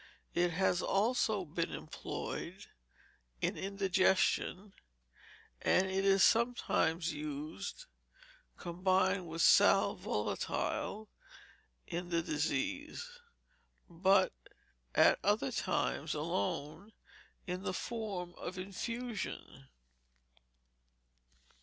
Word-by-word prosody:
It 175 0 +2
has 180 0 +2
also 215 -1 +1
been 165 +2 -2
employed - - -6 0.7
in - - 0
indigestion, 190 0 +1 0.9
and 185 - +3
it 190 +1 0
is 195 -1 +5
sometimes 185 -8 +2
used, 150 -6 -5 0.7
combined 185 +1 +1
with 165 +1 -1
sal - - +6
volatile, 215 +1 -2 0.8
in 175 +1 -4
that 170 -1 0
disease; 285 - -2 0.7
but, 185 - +3 0.6
at - - +6
other - - +2
times - - -1
alone, 155 - -3 0.5
in 180 -1 -3
the - - -2
form 195 -4 -4
of 185 - -5
infusion. 200 - -5
185 Hz, 80 wpm, -34 LUFS, 170-200 Hz, 0.9 s, sal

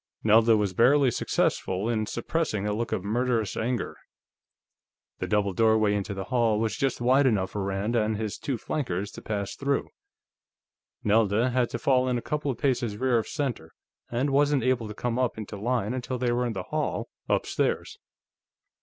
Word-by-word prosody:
Nelda 110 +1 +5
was 100 -3 0
barely 130 +5 +4
successful 95 -2 0
in 110 -2 0
suppressing 120 -4 -2
a 105 - 0
look 115 +1 -2
of 90 - -1
murderous 115 -1 0
anger. 120 +2 -2 1.2
The - - -2
double 105 -2 +1
doorway 110 +1 +3
into 100 0 -2
the 95 - -4
hall 115 -2 +1
was 110 -1 0
just 135 -2 -1
wide 130 +3 +4
enough 100 -6 +1
for 105 - -3
Rand 100 +4 -1
and 110 -1 +1
his 110 -1 -4
two 135 -4 -2
flankers 100 - -3
to - - -10
pass 100 -2 -3
through; 140 0 -1 1.1
Nelda 110 +3 +3
had 125 -1 +1
to - - -3
fall 130 +1 +2
in 125 - +1
a - - -3
couple 150 -1 -2
of 130 - -2
paces 120 -6 0
rear 125 0 +2
of 110 - -4
center, 125 - -3 0.4
and 130 +4 0
wasn't 145 -1 +3
able 125 -3 +1
to 105 - -8
come 120 +1 -2
up 125 -3 0
into 105 -1 -6
line 115 +1 -1
until 130 0 -3
they 125 -1 0
were 120 +1 +1
in 115 - -3
the 95 -3 -4
hall - - -2 0.2
upstairs. - - 0
115 Hz, 180 wpm, -27 LUFS, 105-125 Hz, 1.2 s, Nelda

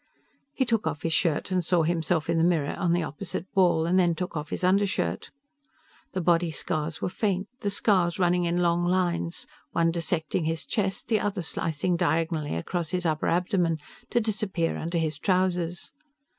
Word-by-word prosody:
He 260 - +2
took 225 -6 0
off 145 -2 -3
his 165 - 0
shirt 165 +1 +1
and 185 -1 +1
saw 170 0 +2
himself 165 -1 0
in 165 0 +1
the - - +3
mirror 165 -5 +2
on 180 -3 0
the 175 0 +2
opposite 150 +3 -5
wall; 175 -4 +4
and 180 +3 +3
then 175 -2 +3
took 180 +1 -4
off 150 0 -4
his - - -4
under 195 +3 +4
shirt. 190 - -2 0.8
The 185 - -1
body 170 0 +3
scars 155 +1 -3
were - - +1
faint, 190 0 -1
the 205 - -1
scars 190 -4 +2
running 180 -1 +2
in 175 +1 +1
long 170 0 +2
lines, 175 -1 0 0.3
one 165 0 +3
dissecting 165 -1 -1
his 160 0 -2
chest, 195 -3 -1
the 220 -2 +2
other 200 -3 -2
slicing 165 +2 -1
diagonally 160 - 0
across 165 - -2
his 180 -1 -2
upper 155 -2 0
abdomen 175 -2 +1 0.3
to - - +2
disappear 205 -6 -1
under 170 +2 -2
his 155 -3 -1
trousers. 180 -2 0
175 Hz, 185 wpm, -27 LUFS, 165-185 Hz, 0.8 s, wall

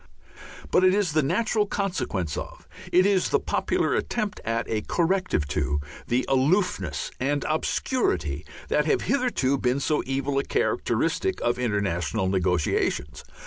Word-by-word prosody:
But 185 - +4
it 185 +1 +5
is 200 -5 +1
the 155 - +4
natural 210 +7 +1
consequence 145 - -2
of, - - -7 0.2
it 185 +1 +5
is 195 -2 +2
the - - +3
popular - - 0
attempt 215 -3 -2
at 115 +1 -1
a 110 -1 -1
corrective 175 - 0
to, 75 0 0 0.3
the 125 +2 +1
aloofness 130 - +1
and 145 +2 0
obscurity 90 - 0 0.2
that 150 - +2
have - - +2
hitherto 235 - +1
been 125 +2 +1
so 150 +2 +1
evil 135 +1 0
a - - 0
characteristic 380 - 0
of 120 +1 0
international 100 -5 0
negotiations. 90 -4 0
135 Hz, 140 wpm, -25 LUFS, -, 0.3 s, it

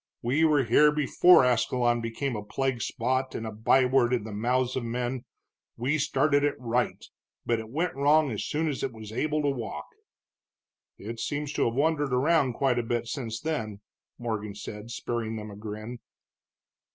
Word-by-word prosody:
We 135 +7 +2
were 150 -3 +4
here 150 +6 +5
before 150 +1 +5
Ascalon 120 0 +2
became 115 +3 -3
a 105 - -3
plague 130 +2 -2
spot 130 +1 -1
and 115 - -4
a 110 - -4
by 115 +5 +3
word 125 -1 +3
in 120 - 0
the 110 - -7
mouths 125 +4 0
of 130 - -2
men; 120 +2 -3 0.5
we 140 +6 0
started 145 -1 +2
it 145 -1 +1
right, 125 0 -1 0.4
but 115 -1 +1
it 110 -1 -8
went 165 +8 -1
wrong 145 +1 +3
as 105 - -3
soon 160 +2 -1
as 145 -3 -2
it 130 - -2
was 110 -1 -9
able 150 +5 -1
to 145 - +2
walk." 125 -5 -4 1.1
"It 115 +3 -7
seems 145 +3 -3
to - - +1
have 115 - -1
wandered 145 -1 +1
around 140 -1 +3
quite 125 0 +1
a - - -1
bit 120 +1 -1
since 115 -3 -4
then," 110 -10 -3 0.4
Morgan 110 -4 -4
said, 105 +2 -8
sparing 115 -1 -3
them 105 -1 -6
a - - -9
grin. 110 +3 -7
125 Hz, 180 wpm, -27 LUFS, 115-140 Hz, 1.1 s, here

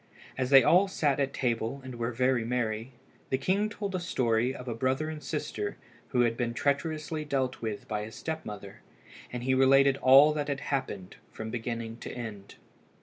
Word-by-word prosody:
As 130 -1 -1
they 135 -2 +8
all 185 +8 +5
sat 145 -7 0
at 140 -1 +1
table 120 0 -1
and 130 -1 -7
were 120 0 -2
very 125 0 +1
merry, 115 0 -2 0.4
the 130 - +1
king 195 +9 +1
told 205 -2 -5
a 185 - 0
story 125 -8 +1
of 130 -1 -9
a 120 - -2
brother 130 +6 -1
and 155 -1 -7
sister 410 - -4 0.3
who 125 - +1
had 115 -1 +2
been 120 -1 -2
treacherously 155 +3 -1
dealt 135 -3 -2
with 110 -3 -4
by 105 -1 -2
a 105 +1 -6
step 160 +6 -5
mother, 100 -2 -9 0.5
and 125 -1 -5
he 130 +1 +2
related 135 +1 +5
all 140 +4 +7
that 150 -1 -2
had 140 -1 -2
happened 105 -9 -3
from 110 0 -6
beginning 115 -1 -4
to - - -7
end. 110 -5 -7
130 Hz, 190 wpm, -29 LUFS, 115-145 Hz, 0.5 s, they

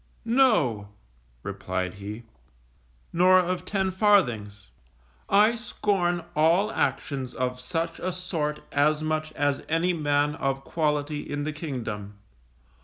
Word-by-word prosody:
No_, 215 - +3 0.6
replied 90 0 -3
he, 105 +3 -7 0.9
_nor 185 +2 +6
of 180 0 -1
ten 190 -1 0
farthings. 125 - +2 0.6
I 210 +3 +5
scorn 195 -6 -1
all 170 +7 +3
actions 135 - -2
of 125 0 -2
such 165 +6 -3
a 185 - -2
sort 165 -5 -3
as 150 +2 +2
much 155 0 -1
as 145 -2 0
any 165 +3 +2
man 145 -2 +1
of 135 -3 -2
quality 150 -1 -1
in 145 0 -2
the 155 +1 -3
kingdom. 115 -9 -5
155 Hz, 115 wpm, -26 LUFS, 135-180 Hz, 0.9 s, nor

